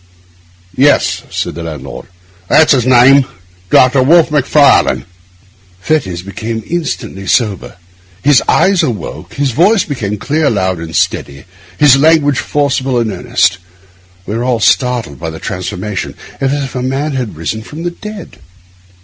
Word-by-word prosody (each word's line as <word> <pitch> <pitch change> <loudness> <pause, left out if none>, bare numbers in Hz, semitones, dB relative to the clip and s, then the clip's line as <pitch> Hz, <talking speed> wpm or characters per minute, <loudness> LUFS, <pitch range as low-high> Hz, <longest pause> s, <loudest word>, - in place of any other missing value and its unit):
'Yes,' 145 +3 +2
said - - -3
the 85 - -7
landlord, 75 -4 -8 0.4
'that's 155 +9 +4
his 130 -5 +3
name, 130 +2 +6 0.5
Doctor 130 +5 +4
Wolfe 160 +4 +4
Macfarlane.' 145 0 +3 0.7
Fettes 95 - -1
became 110 +3 -5
instantly 120 - -4
sober; 105 -4 0 0.5
his 140 -3 +4
eyes 190 -2 +3
awoke, 115 - -5
his 140 0 0
voice 185 - +3
became 105 -8 -4
clear, 150 +7 0
loud, 95 -4 -1
and 80 0 -7
steady, 70 0 -2 0.3
his 140 -3 +6
language 145 -2 +3
forcible 135 -3 -1
and 115 -2 0
earnest. 95 0 0 0.7
We 105 - -4
were 115 - -2
all 125 -2 0
startled 120 - 0
by 80 0 -4
the 80 - -8
transformation, 95 +2 -5 0.2
as 135 0 0
if 140 -2 -3
a 125 - -3
man 135 +4 -2
had 125 - -4
risen 85 +7 -4
from 150 +9 -9
the 175 - -2
dead. 210 +2 -10
125 Hz, 140 wpm, -13 LUFS, 100-145 Hz, 0.7 s, name